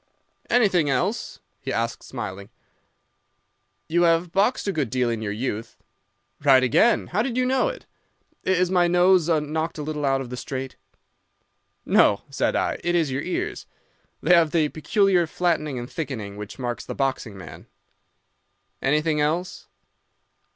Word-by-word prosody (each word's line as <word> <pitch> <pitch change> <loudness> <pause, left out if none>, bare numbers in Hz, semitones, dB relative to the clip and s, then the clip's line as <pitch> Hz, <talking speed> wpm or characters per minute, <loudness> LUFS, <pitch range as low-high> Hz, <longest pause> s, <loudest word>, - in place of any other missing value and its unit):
"'Anything 195 -11 +3
else?' 180 - -1 0.2
he - - -5
asked, 115 +1 -2
smiling. 100 -5 -7 1.4
"'You 170 +2 +1
have 165 0 +3
boxed 205 +5 +1
a - - +2
good 150 -9 -1
deal 125 -1 0
in 115 -1 -3
your 105 -2 -3
youth.' 110 0 -4 0.7
"'Right 135 -3 +6
again. 130 - +3
How 200 +4 -1
did 245 0 -2
you 255 - +2
know 265 - +2
it? - - -6 0.6
Is 185 -1 +1
my 180 -2 +4
nose 180 -1 +4
knocked 160 +1 -1
a 150 - -4
little 150 0 -4
out 135 -1 +2
of 130 -2 -7
the 125 - -5
straight?' 130 +2 -5 1.1
"'No,' 100 - +4
said 140 - 0
I. - - 0
'It 175 0 +1
is 160 -5 +1
your 135 +2 -2
ears. 180 - -4 0.6
They 180 - +5
have 170 -2 +5
the 155 -1 +1
peculiar 180 +2 +2
flattening 155 -5 -1
and 120 0 -5
thickening 125 -10 -5
which 105 0 -8
marks 120 -2 -4
the - - -7
boxing 130 -6 -2
man.' 95 - -11 1.1
"'Anything 150 +2 +1
else? 165 +5 -2
155 Hz, 150 wpm, -24 LUFS, 130-180 Hz, 1.4 s, Right